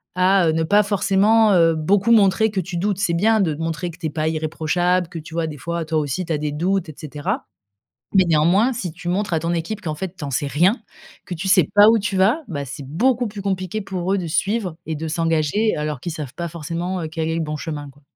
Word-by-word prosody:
à, 185 -1 +4
heu, - - +3
ne 160 0 +1
pas 205 +6 +4
forcément, 205 +2 +3
heu, 165 -2 +4
beaucoup 195 +8 +2
montrer 215 0 +4
que 200 - -1
tu 180 0 -5
doutes. 195 +2 0
C'est 185 -3 +1
bien 215 +6 +3
de 160 -5 0
montrer 165 +2 -3
que 165 - -15
tu 160 - -2
es - - -2
pas 155 +1 -2
irréprochable, 160 +3 0
que 165 - -6
tu 160 +1 -11
vois, 165 -1 0
des 150 -2 -7
fois, 170 +2 -4
toi 160 0 0
aussi 150 +5 -2
tu 165 - -2
as - - 0
des 150 0 -2
doutes, 175 +3 -1
et 155 - -9
cetera, 145 -1 -4 0.7
mais 190 -1 +6
néanmoins, 170 +10 +3
si 180 -8 -4
tu 175 +1 -8
montres 200 +1 -1
à 160 - +1
ton 165 +2 -1
équipe 185 +6 -3
qu'en 155 -6 -3
fait, 185 +3 -6
tu 150 - -6
en 140 - -4
sais 145 +3 -1
rien, 170 - +3 0.5
que 180 - -4
tu 185 +4 -4
sais 185 -6 +4
pas 205 +1 +8
où 225 0 +5
tu 200 -1 -2
vas, 220 +12 +3
bah, 145 -5 -4
c'est 135 +1 -8
beaucoup 240 - +1
plus 205 -1 -8
compliqué 190 +1 -2
pour 190 -1 -3
eux 200 - +2
de 180 - -4
suivre 185 +2 -1
et 160 -1 -3
de 160 +1 -4
s'engager, 165 +6 +1
alors 150 -3 -3
qu'ils 170 +4 -4
savent 150 -5 -7
pas 170 -1 -4
forcément, 170 +3 -4
heu, 160 - -4
quel 160 0 -3
est 160 - -1
le - - -1
bon 150 0 -3
chemin, 145 -2 -6
quoi. 140 +2 -23
170 Hz, 260 wpm, -21 LUFS, 155-195 Hz, 0.7 s, pas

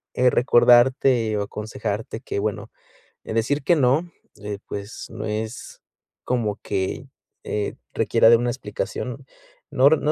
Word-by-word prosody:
eh, 125 0 +4
recordarte 120 -2 +4
o 100 - 0
aconsejarte 105 +1 -5
que, - - -3
bueno, 105 +1 -3 0.5
eh, - - -6
decir 135 +6 0
que, 170 - +4
no, 150 +5 +2 0.3
eh, 105 -1 -5
pues 100 +2 -7
no 105 - -6
es 110 +1 -5 0.4
como 110 -5 -1
que, 95 -2 -3 0.4
eh, 105 -1 -3 0.2
requiera 110 - +4
de 115 - +7
una 120 +1 -1
explicación. 485 - -5 0.5
No, 135 +1 +5
r 160 +1 +5
No 150 - 0
115 Hz, 140 wpm, -23 LUFS, 105-130 Hz, 0.5 s, de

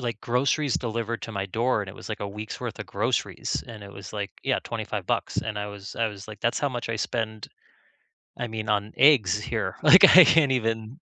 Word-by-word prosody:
like, 115 -3 -4
groceries 135 +3 0
delivered 115 -1 -3
to 115 - -6
my 100 -1 -3
door, 115 +3 0
and 95 - -8
it 95 - -9
was, - - -10
like, 110 - -5
a 100 - -3
week's 105 +2 -7
worth - - -5
of - - -5
groceries, - - -2
and 110 -3 -10
it 100 - -10
was, 95 -2 -10
like, 100 -1 -4
yeah, - - +1
25 - - -5
bucks, - - -1
and 110 -1 -3
I 105 - -3
was 100 -1 -9
I 115 - +1
was 105 -1 -8
like, 105 - -10
that's 120 0 0
how 145 - +1
much 120 -3 -5
I 115 - -1
spend, 110 -2 -3 0.9
I 120 - -3
mean, 110 -1 -5
on 105 0 0
eggs 115 - +5
here, 105 - -3
like, - - +8
I - - +11
can't 150 -4 +4
even 115 +1 -2
110 Hz, 230 wpm, -25 LUFS, 105-120 Hz, 0.9 s, I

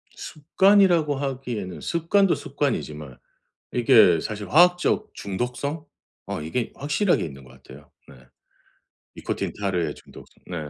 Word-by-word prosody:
습관이라고 170 -1 +2
하기에는 125 -9 -5
습관도 175 +3 +1
습관이지만 75 - -4 0.6
이게 115 - +5
사실 105 +2 -6
화학적 180 +5 +3
중독성? 125 +10 -4 0.4
어 - - -5
이게 110 +10 -3
확실하게 145 +7 0
있는 70 -4 -9
것 65 - -17
같아요. 70 +3 -15 0.2
네. - - -14 1.0
니코틴, - - -4
타르의 90 -7 -1
중독성. - - -17
네. 90 - -6
130 Hz, 285 characters per minute, -24 LUFS, -, 1.0 s, 이게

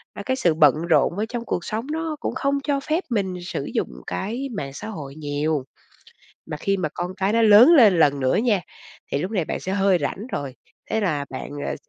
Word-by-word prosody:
ờ, 205 - -6
cái 260 - 0
sự 175 -10 +2
bận 150 -4 +5
rộn 170 +2 +3
ở 210 - 0
trong 235 -1 -4
cuộc 175 -5 -3
sống 225 +4 -4
nó 320 0 -2
cũng - - -3
không 280 0 0
cho 285 -1 0
phép 310 +6 -1
mình 200 -6 -1
sử 140 -6 -4
dụng - - -1 0.2
cái 225 - -3
mạng 140 -6 -5
xã - - -7
hội 145 -10 -7
nhiều. 150 -1 -2 0.8
Mà 155 -2 -6
khi 195 +6 0
mà 165 -5 -1
con 180 +1 -4
cái 195 +2 0
nó 230 - +3
lớn 220 +5 +8
lên 215 - +6
lần 145 -3 +4
nữa 130 -1 +1
nha, 215 -4 +2 0.5
thì - - +1
lúc 185 +7 -3
này 185 -7 0
bạn - - -3
sẽ 190 - -4
hơi 195 -2 +3
rảnh 210 +6 -3
rồi, 135 -2 -4 0.4
thế 220 - +1
là 155 -8 0
bạn, - - -6 0.2
ờ, - - -2
195 Hz, 225 wpm, -23 LUFS, 155-230 Hz, 0.8 s, lớn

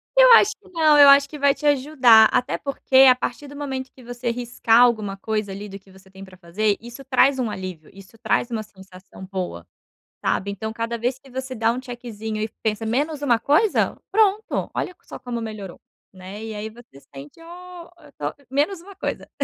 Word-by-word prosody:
Eu - - +7
acho 425 -2 +6
que 395 -2 -21
não, 315 -4 +3
eu 285 -1 +9
acho 280 0 +6
que 300 - -8
vai 280 0 +4
te 300 - -9
ajudar. 260 -6 +5
Até 250 0 0
porque 275 -1 -1
a 250 - +6
partir 255 +3 -5
do 285 - -12
momento 265 -2 -5
que 255 - -18
você 240 0 -4
riscar 240 -1 +2
alguma 215 -5 +2
coisa 215 -1 -3
ali 200 +2 -7
do 195 +1 -9
que 190 0 -22
você 190 0 -19
tem 190 +1 -13
para 185 -1 -14
fazer, 200 +4 -1
isso 240 +3 -11
traz 265 +1 +3
um 235 -3 -1
alívio, 185 -5 -7
isso 195 +2 -16
traz 240 - 0
uma 220 -2 -3
sensação 190 -1 -14
boa, 180 - -6 0.6
sabe. 200 - -1
Então 220 +2 -5
cada 230 +1 -3
vez 250 +3 -2
que 270 - -19
você 260 0 -6
dá 225 0 +1
um 250 +2 -4
checkzinho 225 -4 -6
e 215 - -2
pensa: 220 0 -2
"Menos 290 +6 -1
uma 240 -5 +2
coisa", 345 +9 +1
pronto, 425 0 +1
olha 360 - -4
só - - -10
como 240 -2 -5
melhorou, 210 -5 -8 0.3
né. 190 +3 -10
E 220 -1 -6
aí 215 +1 -5
você 230 - -17
sente: 140 - -12
"Ó, 350 0 -12
eu 295 -3 -18
tô" - - -4 0.2
menos 305 +7 -1
uma 395 +1 -14
coisa, - - -5
240 Hz, 205 wpm, -22 LUFS, 210-280 Hz, 0.6 s, eu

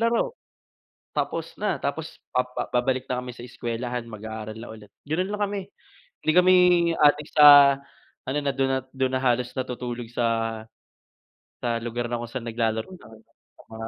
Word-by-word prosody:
laro 235 - +1 0.8
tapos 165 0 -2
na. 210 +1 0
Tapos 155 +3 -4 0.2
pa 125 - +2 0.3
babalik 130 +1 0
na 125 - -1
kami 125 - -6
sa 120 - -10
eskwelahan, 120 0 -4
mag-aaral 110 0 -7
na 115 - -9
ulit, 105 -2 -13 0.2
ganun 180 +6 -1
lang 210 - -7
kami. 205 0 -2 0.7
Hindi 155 - +4
kami 180 +1 +6 0.4
adik 150 0 +4
sa 145 -2 +9 0.5
ano, 135 +3 -1
na 140 - 0
dun 135 0 +1
at - - -27
dun 130 -1 0
na 130 - 0
halos 125 -1 +1
natutulog 125 -2 -5
sa 115 -2 -1 1.0
sa 120 -1 0
lugar 120 +1 -3
na 120 - -1
kung 120 - -5
saan 130 -2 -5
naglalaro 115 +4 -1
ng 185 - -12 0.7
mga 110 0 -6
125 Hz, 160 wpm, -25 LUFS, 115-145 Hz, 1.0 s, sa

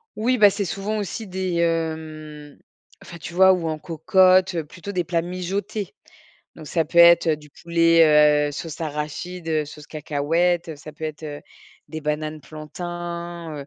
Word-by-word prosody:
Oui, 250 +4 +1
ben, 205 -3 +7
c'est 200 +1 -2
souvent 200 +3 -3
aussi 215 +3 -5
des, 185 -2 -3
hem, 160 -3 -3 0.5
enfin, 175 - -11
tu 170 - -9
vois? 190 +1 +6
Ou 180 -3 0
en 155 -1 -3
cocotte, 185 +3 +3
heu, 165 -2 -2
plutôt 175 +6 -9
des 180 -3 -1
plats 170 -1 -1
mijotés. 190 - -4 0.6
Donc 155 - -11
ça 160 +1 0
peut 165 - -10
être, 170 0 +7
heu, 160 -2 +2
du 150 -1 -17
poulet, 155 -3 +4
heu, - - -4
sauce 160 +2 -7
arachide, 160 +3 -5
heu, 155 -1 0
sauce 150 0 -12
cacahuète, 165 +4 0
heu, 155 - -7
ça 155 +1 -11
peut 160 +1 -8
être, 155 0 -6
heu, 145 -1 -6 0.5
des 155 - -6
bananes 155 +1 -3
plantains. 170 +1 -7
Heu, 140 - -8
165 Hz, 175 wpm, -23 LUFS, 155-180 Hz, 0.6 s, ben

